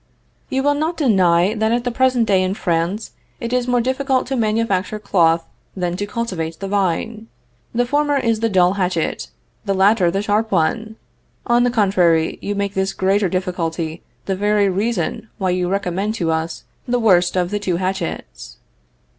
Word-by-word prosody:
You 265 0 0
will 290 0 +3
not 315 +4 -2
deny 190 - +3
that 220 0 0
at 240 +1 +1
the 245 - -1
present 255 -1 +2
day 195 -3 +3
in 185 +1 -1
France 175 +4 -1 0.3
it 235 +1 -4
is 250 -1 +1
more 245 -1 +2
difficult 260 +1 0
to 270 - -3
manufacture 215 -3 0
cloth 165 -5 +2 0.3
than 175 -1 -1
to 205 +1 -3
cultivate 185 -9 -4
the 195 - -4
vine 205 +3 -1 0.4
the 245 +1 +1
former 290 +2 +1
is 230 -4 +1
the 230 0 +1
dull 185 -2 +3
hatchet, 180 -4 -1 0.4
the 195 -1 0
latter 190 -1 +4
the 195 +4 -1
sharp 215 +1 0
one 215 +6 0 0.5
on 240 0 +3
the - - +3
contrary, 185 -8 +2
you 205 - -3
make 200 0 -2
this 190 0 -1
greater 195 +1 +1
difficulty 170 -3 -3 0.2
the 195 - -1
very 205 +1 +2
reason 220 +2 -2
why 190 -4 0
you 180 0 0
recommend 195 +2 -1
to 170 -7 -1
us 160 +1 -3 0.2
the 245 0 +1
worst 185 -6 +3
of 180 0 0
the 205 - -1
two 190 -4 -1
hatchets. 180 - -4
200 Hz, 175 wpm, -19 LUFS, 180-230 Hz, 0.5 s, latter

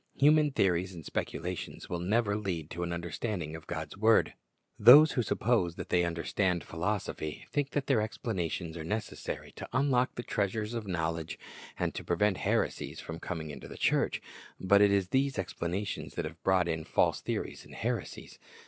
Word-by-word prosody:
Human 150 +1 +5
theories 95 -7 +1
and 80 -4 -9
speculations 90 0 -4
will 90 -1 -3
never 100 +3 +1
lead 90 -7 -3
to 85 - -5
an 85 0 -2
understanding 85 -1 -3
of 80 - -10
God's 80 -2 -5
word. 110 +3 +4 0.5
Those 140 +8 +10
who 125 - +1
suppose 100 -5 +1
that - - -7
they 90 -1 +3
understand 85 +1 0
philosophy 85 -3 -3
think 145 -1 0
that 145 -2 0
their 130 -6 +3
explanations 90 -6 -3
are 80 - -5
necessary 105 +6 -4
to - - -7
lyilock 130 -1 +2
the 120 - -4
treasures 105 +1 -1
of 115 -3 -4
knowledge 80 -3 -2 0.4
and - - -1
to - - -5
pre 85 - -1
vent 105 0 +3
heresies - - -1
from 80 0 -7
coming 80 -4 -5
into 70 - -9
the - - -10
church. - - +1 0.4
But 100 +2 +5
it 100 -1 +6
is 100 -2 +2
these 135 +1 +1
explanations 95 +1 -3
that 85 - -2
have 80 +1 -8
brought 95 -2 +3
in 80 -1 -1
false - - +1
theories - - -4
and - - -13
heresies. - - -4
95 Hz, 175 wpm, -31 LUFS, 85-110 Hz, 0.5 s, Those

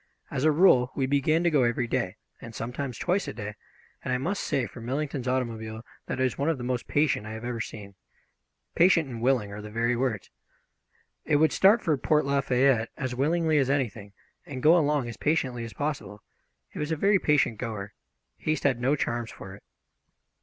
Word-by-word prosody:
As 130 - -2
a 155 - +6
rule 145 -7 +5
we 135 - +1
began 145 +5 +2
to 170 - +3
go 145 -3 +4
every 120 0 +1
day, 115 -6 -2 0.3
and 115 -1 -10
sometimes 125 +1 -4
twice 185 +3 0
a - - -4
day, 105 -1 -6 0.5
and - - -3
I 125 - +2
must 180 +10 -2
say 130 - 0
for 115 +3 -10
Millington's 135 +1 -3
automobile 115 -3 -3 0.2
that - - -3
it - - +2
was 130 0 -1
one 140 +3 +1
of 165 - 0
the 125 - -7
most 125 -1 -2
patient 145 -8 +1
I 110 - -6
have 110 +2 -7
ever 120 -2 -3
seen. 105 -2 -8 0.8
Patient 170 -3 +4
and 120 -3 -7
willing 120 -5 +1
are 105 +1 -7
the 105 - -8
very 115 +3 0
words. 120 -5 -2 0.9
It 150 - +1
would 155 +2 +4
start 210 +5 +5
for 160 -4 +2
Port 150 +2 +2
Lafayette 135 -4 +2
as 130 -2 -3
willingly 155 +4 +2
as 135 -1 +1
anything, 115 -7 -2 0.3
and 130 -3 -7
go 160 +3 +7
along 150 -6 +2
as 115 - -7
patiently 130 -6 0
as 115 - -9
possible. 140 -9 -4 0.5
It - - -7
was 150 +1 -2
a - - +2
very 195 +5 +3
patient 145 -9 +2
goer. 105 -4 -5 0.5
Haste 155 -2 -1
had 130 -4 +1
no 135 +4 +2
charms 120 -4 -2
for 95 - -10
it. 100 - -13
130 Hz, 205 wpm, -27 LUFS, 115-150 Hz, 0.9 s, go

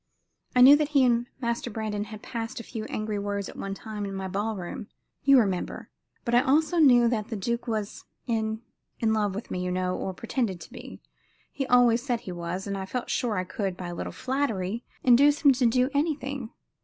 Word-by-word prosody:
"I 250 - +6
knew 270 +3 +10
that 300 -1 0
he 265 - +6
and 240 0 +2
Master 235 0 -2
Brandon 210 -2 -3
had 215 -1 -10
passed 230 +2 -5
a - - -7
few 220 -2 -6
angry 215 -1 -3
words 200 -1 -3
at - - -10
one 195 0 -4
time 215 0 -6
in 195 -1 -4
my 190 0 -3
ball 205 +4 -2
room 185 +2 -6 0.4
you 275 0 +7
remember 195 -7 -1 0.3
but 235 - -1
I 240 - +6
also 310 +6 +2
knew 245 -6 +6
that 220 -3 -1
the 235 - -4
duke 235 +5 -2
was 215 -3 -3 0.2
in 220 -1 -1 0.4
in 220 -1 +2
love 205 -3 0
with 210 - -6
me, 180 - -2
you 180 - -2
know, 185 0 -1
or 190 - -4
pretended 225 -3 -2
to - - -11
be - - -10 0.5
he 270 -2 -3
always 245 -2 +5
said 245 -3 -2
he 185 - -7
was 175 +2 -4
and 200 -1 -3
I 190 - -5
felt 250 +4 -3
sure 230 -5 0
I 185 - 0
could, 185 0 -3
by 180 -1 -5
a - - -5
little - - -5
flattery, 235 -6 -2 0.2
induce 280 +4 +5
him 280 - +9
to 255 -2 +3
do 250 +3 +2
anything. 280 -4 -1
225 Hz, 215 wpm, -27 LUFS, 200-250 Hz, 0.5 s, knew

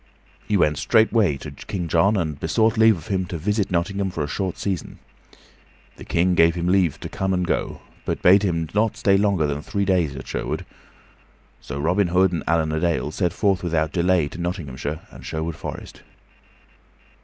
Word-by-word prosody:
So - - -31
he 105 - +2
went 75 -4 +2
straightway 110 - +3
to - - -8
King 90 -4 -5
John 95 +6 +3
and 80 -6 -2
besought 110 +8 +2
leave 110 -2 +5
of 80 - -12
him 95 -2 -1
to 85 - -4
visit 105 +4 0
Nottingham 95 +2 -1
for 85 -4 -3
a - - -3
short 95 +4 -3
season. 95 -5 -4 1.0
The - - -10
King 90 +2 +2
gave 85 0 +4
him 85 -1 -2
leave 90 -4 +2
to - - -5
come 95 0 -1
and 90 0 0
to - - -8
go, - - -2 0.2
but - - -3
bade 95 +2 +7
him 85 -5 -1
not 110 +1 +1
stay 100 - +3
longer 100 -5 +2
than 75 0 -2
three 100 +5 -2
days 90 -7 +1
at 65 - -8
Sherwood. - - -3 0.9
So 70 - -7
Robin 90 +6 +2
Hood 90 +1 +3
and 85 - -3
Allan 80 -1 +1
a 80 - -1
Dale 85 -3 0
set 90 +1 0
forth 95 +2 +1
without 80 -3 0
delay 90 -3 +2
to 85 - -8
Nottinghamshire 75 -4 -4
and - - -12
Sherwood 80 0 -4
Forest. - - -8
90 Hz, 195 wpm, -23 LUFS, 80-100 Hz, 1.0 s, bade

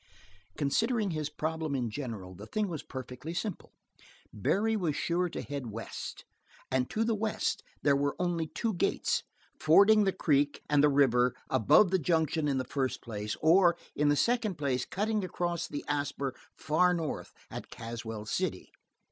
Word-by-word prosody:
Considering 215 - +1
his 155 -2 -2
problem 155 -1 -2
in 120 -4 -1
general, 110 -8 -5
the 100 +4 -10
thing 215 - -1
was 165 -5 -4
perfectly 130 +5 -7
simple: 185 +1 -4 0.6
Barry 210 - +1
was 170 -8 0
sure 175 +3 0
to - - -5
head 140 -3 -5
west, 115 +1 -7 0.5
and 130 -1 +1
to 220 - 0
the 225 0 +1
west 215 0 -1 0.2
there 140 -1 +4
were 140 0 0
only 175 -2 -1
two 225 +7 -2
gates 175 - +1 0.4
fording 200 +7 +6
the 195 - +3
creek 145 -4 +1
and 145 -1 +4
the 150 - +6
river 125 -3 +3 0.2
above 180 - +5
the 190 - +3
junction 160 -1 +1
in 140 -2 +1
the 130 - 0
first 130 0 -2
place, 105 -2 -4
or 175 +1 +5 0.2
in 145 0 +3
the 145 - +4
second 225 - +1
place 130 -4 0
cutting 210 +1 -1
across 175 -2 -2
the 145 - -6
Asper 145 -2 -1 0.2
far 180 +4 +3
north 160 -3 -4 0.2
at - - -7
Caswell 115 -2 -6
City. 105 - -2
150 Hz, 165 wpm, -30 LUFS, 130-180 Hz, 0.6 s, fording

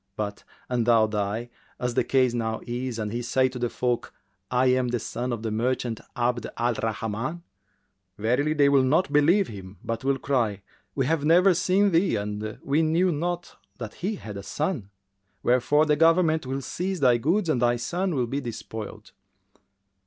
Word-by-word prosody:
But, 105 -1 -4 0.2
an 120 -2 0
thou 115 -2 +5
die, 105 +3 -2 0.3
as 125 -1 -1
the - - +2
case 130 -3 +2
now 110 -2 -2
is, 120 0 -3
and 105 -2 -3
he 120 +2 -2
say 130 +2 +2
to 125 0 -7
the 120 0 0
folk, 125 -1 -1 0.4
'I 125 +1 +2
am 130 0 +3
the 120 0 0
son 120 +2 -4
of 115 -2 -4
the 110 - -2
merchant 120 0 -1
Abd 120 -1 0
al 120 +1 +1
Rahman,' 115 +9 -3 0.7
verily 125 +8 +1
they 145 -2 +5
will 140 -1 +5
not 145 +4 +2
believe 170 +7 +4
him, 95 -2 -10
but 115 +2 -3
will 135 0 +1
cry, 115 -8 -1 0.3
'We 135 - +1
have 155 +1 0
never 180 +5 +5
seen 190 +3 +2
thee 175 +3 +3
and 105 +1 -4
we 145 +3 +2
knew 165 +3 +2
not 175 +3 -3 0.2
that 115 -4 -6
he 205 +5 -3
had 105 - -8
a - - -5
son,' 145 - -3 0.5
wherefore 135 +5 +3
the 150 -1 +3
government 165 -2 +3
will 135 +1 -2
seize 180 +8 -3
thy 125 -4 +5
goods 170 - +1
and 135 -6 +1
thy 120 0 +3
son 175 +8 -2
will 125 -3 +1
be 135 +4 -3
despoiled. 110 -3 -7
125 Hz, 180 wpm, -26 LUFS, 115-155 Hz, 0.7 s, thou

